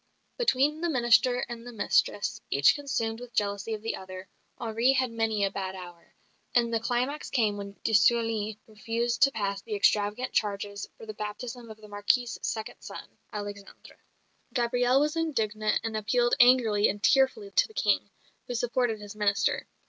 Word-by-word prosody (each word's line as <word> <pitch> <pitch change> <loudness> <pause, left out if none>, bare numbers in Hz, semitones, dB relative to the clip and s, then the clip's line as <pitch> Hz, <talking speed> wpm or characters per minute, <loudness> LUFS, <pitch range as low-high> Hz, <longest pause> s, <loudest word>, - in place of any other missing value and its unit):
Between 300 - +2
the 345 - 0
minister 245 -2 +3
and 235 -1 -7
the 245 - -9
mistress, 205 -2 0
each 140 +1 +5
consumed 230 -6 -2
with 245 -1 -11
jealousy 205 +2 -1
of 210 - -11
the 225 - -2
other, 185 0 -9 0.3
Henri 230 +3 +2
had 255 -2 +1
many 225 -2 0
a 195 - -2
bad 190 -1 -4
hour; 175 -2 -12 0.4
and 235 -1 +3
the 225 - +2
climax 250 +5 -2
came 220 -6 +1
when 200 0 -7
de 220 - 0
Sully 220 -1 +2
refused 230 +2 -2
to 275 - +6
pass 200 -4 -2
the 215 0 -5
extravagant 210 +3 +1
charges 200 -1 -2
for - - -11
the 215 - -6
baptism 230 +3 -6
of 220 - -10
the 215 -1 -14
Marquise's 210 +4 0
second 220 -1 -4
son, - - -9 0.2
Alexander. 205 -1 -8 0.6
Gabrielle 245 +1 +2
was 300 +2 +1
indignant 215 -10 0
and 225 -1 -3
appealed 240 +3 +1
angrily 240 -4 +5
and 205 +1 -4
tearfully 275 +10 +3
to - - +3
the 440 - -18
King, - - +1 0.4
who 245 - -4
supported 240 -1 0
his 205 0 -9
minister. 205 -1 +1
225 Hz, 170 wpm, -28 LUFS, 205-245 Hz, 0.6 s, to